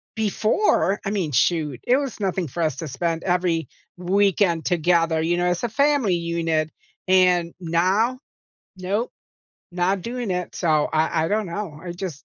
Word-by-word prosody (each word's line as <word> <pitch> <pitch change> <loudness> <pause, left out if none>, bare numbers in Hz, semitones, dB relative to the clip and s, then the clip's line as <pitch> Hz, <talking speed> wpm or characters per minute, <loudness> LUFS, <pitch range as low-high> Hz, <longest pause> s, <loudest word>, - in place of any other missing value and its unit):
before, 215 - +1
I 195 - -1
mean, 185 -8 -1
shoot, 150 -2 +1
it 250 - +5
was 275 -5 -4
nothing 190 -3 -1
for 160 +6 -5
us 155 -4 -1
to 160 - -5
spend 165 +5 -2
every 175 -5 0 0.3
weekend 185 -2 +1
together, 165 -2 +2
you 170 +2 +1
know, 175 - 0
as 180 +3 -1
a 240 - 0
family 275 -5 +2
unit, 165 -2 -1 0.4
and 180 -2 +3
now, 185 +9 +1 0.6
nope, 200 +6 -2 0.6
not 180 +2 0
doing 240 -1 -4
it, 180 -1 -3
so, 155 -4 +1
I 160 0 +1
I - - -1
don't 210 +1 0
know, 170 -3 -5
I 175 -1 -5
just 175 -6 -6
180 Hz, 160 wpm, -23 LUFS, 165-200 Hz, 0.6 s, it